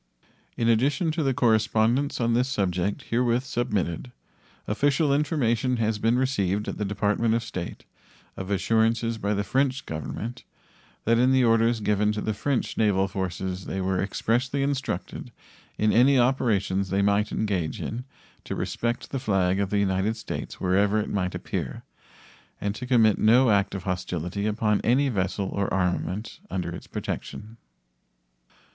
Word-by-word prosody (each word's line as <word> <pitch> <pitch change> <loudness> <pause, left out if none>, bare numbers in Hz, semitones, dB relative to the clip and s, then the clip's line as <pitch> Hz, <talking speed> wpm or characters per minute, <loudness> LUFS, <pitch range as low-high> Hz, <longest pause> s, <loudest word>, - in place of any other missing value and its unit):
In 115 - +1
addition 140 +8 +2
to 160 +1 -2
the 135 -3 +2
correspondence 115 +3 +2
on 115 -1 +1
this 125 +2 +2
subject 95 -4 -1
herewith 120 +1 +2
submitted, 115 -4 -2 0.6
official 140 +6 +2
information 130 -5 +1
has 110 -2 0
been 115 +3 +2
received 105 -6 0
at - - -4
the 105 - 0
Department 105 +3 +1
of 115 - -1
State 90 -7 -6 0.5
of 95 0 -6
assurances 115 +2 +1
by 105 0 0
the 100 - 0
French 130 +5 0
Government 110 +10 -5 0.6
that 115 +1 +3
in 125 +2 +4
the 130 -1 +4
orders 115 0 +3
given 105 0 +2
to 105 - -3
the 110 - -1
French 135 +4 -2
naval 100 -3 +3
forces 95 -1 -4
they 95 - -3
were 95 0 0
expressly 125 +7 0
instructed, 135 -10 -3 0.5
in 105 0 +2
any 130 +4 +5
operations 105 -7 +1
they 100 +1 +1
might 100 +1 +2
engage 95 -7 -1
in, 120 +3 -4 0.4
to - - -5
respect 120 0 -3
the 135 - -2
flag 95 -6 +1
of 100 -1 0
the 105 - 0
United 100 +2 +1
States 110 - -6
wherever 100 +3 +2
it 105 - -2
might 90 -3 -1
appear, - - -4 0.8
and 100 0 -2
to 125 +4 -7
commit 115 -5 +4
no 120 +2 +5
act 100 -1 +2
of 95 - -5
hostility 90 +1 -3
upon 105 -1 +1
any 135 +4 +3
vessel 95 -2 -1
or 100 -1 -2
armament 95 +3 -1
under 90 -2 -3
its - - -10
protection. 110 +2 -6
110 Hz, 155 wpm, -26 LUFS, 100-120 Hz, 0.8 s, any